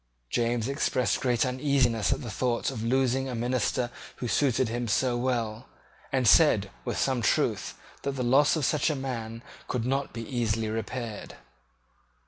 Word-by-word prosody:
James 120 -1 0
expressed 130 -4 0
great 125 -2 +2
uneasiness 130 -4 +1
at - - -1
the 115 - -5
thought 120 +3 0
of 115 -4 -5
losing 130 +2 +1
a 125 - -3
minister 120 0 0 0.2
who 125 - -4
suited 130 0 +2
him 120 +1 -3
so 125 +3 +1
well, 120 -2 -2 0.4
and 130 -3 +1
said, 105 -7 +5
with - - -3
some 130 -3 +1
truth, 110 - +1 0.3
that 140 - -2
the 130 -2 -2
loss 135 +6 +4
of 155 -4 0
such 150 +2 +2
a 155 - 0
man 115 -4 -5 0.2
could 120 -2 -2
not 135 +2 -1
be 115 -1 -6
easily 115 -3 -1
repaired. 115 0 -5
125 Hz, 160 wpm, -28 LUFS, 115-130 Hz, 0.4 s, said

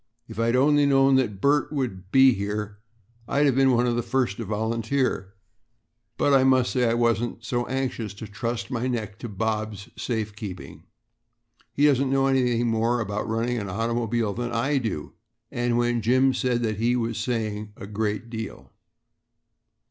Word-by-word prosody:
"If 110 -1 -9
I'd 115 +1 +2
only 145 +2 +4
known 135 -1 +4
that 105 -7 -1
Bert 145 +6 +2
would 100 -10 -4
be 130 -1 +6
here 105 +1 -4 0.5
I'd 140 -1 +3
been 135 +1 +4
one 120 -1 +3
of 120 -1 +1
the 120 - 0
first 120 -3 -1
to 115 - -4
volunteer, 110 0 -1 0.8
but 145 - +2
I 135 -1 +5
must 130 -2 +3
say 125 -2 +2
I 115 - +1
wasn't 120 0 0 0.3
anxious 125 -6 -3
to 105 - -8
trust 115 +5 -4
my 125 0 -1
neck 110 -5 -4
to 120 - -6
Bob's 105 0 -3
safe 110 -4 -3
keeping. 100 -5 -8 0.9
He 145 - +2
doesn't 135 -2 +3
know 135 0 +2
any 125 -3 +2
more 115 +1 +1
about 105 -1 -3
running 115 +2 -1
an 100 -2 -5
automobile 115 +1 -1
than 120 +1 -3
I 135 +5 +1
do;" 110 - -4 0.4
and 120 -2 0
when 120 -1 +1
Jim 130 +4 +3
said 125 -2 0
that 110 -2 -1
he 120 +3 +1
was 115 -2 -2
saying 110 -3 -3
a 105 - -8
great 105 +2 -3
deal. 110 -3 -7
115 Hz, 165 wpm, -25 LUFS, 110-130 Hz, 0.9 s, be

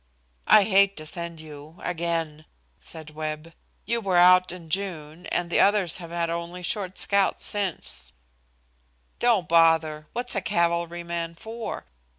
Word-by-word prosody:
"I 210 - +7
hate 200 -1 +4
to 155 - -7
send 170 0 -5
you 150 0 -12
again," 165 -3 -2 0.3
said 155 -1 -9
Webb. 155 +1 -6 0.3
"You 235 0 -1
were 190 -4 +1
out 180 +1 +6
in 175 -2 -10
June, 175 -3 -4
and 175 -1 -2
the - - +2
others 200 -4 +3
have 170 -2 -9
had 170 0 -1
only 170 +1 -5
short 190 0 -3
scouts 200 -1 +1
since 170 - -1 0.5
" - - -41
"Don't 225 -9 +2
bother. 160 -2 +3
What's 245 +1 -1
a 195 - -1
cavalryman 170 -1 -1
for? 225 +5 -7
170 Hz, 145 wpm, -25 LUFS, 155-190 Hz, 0.5 s, I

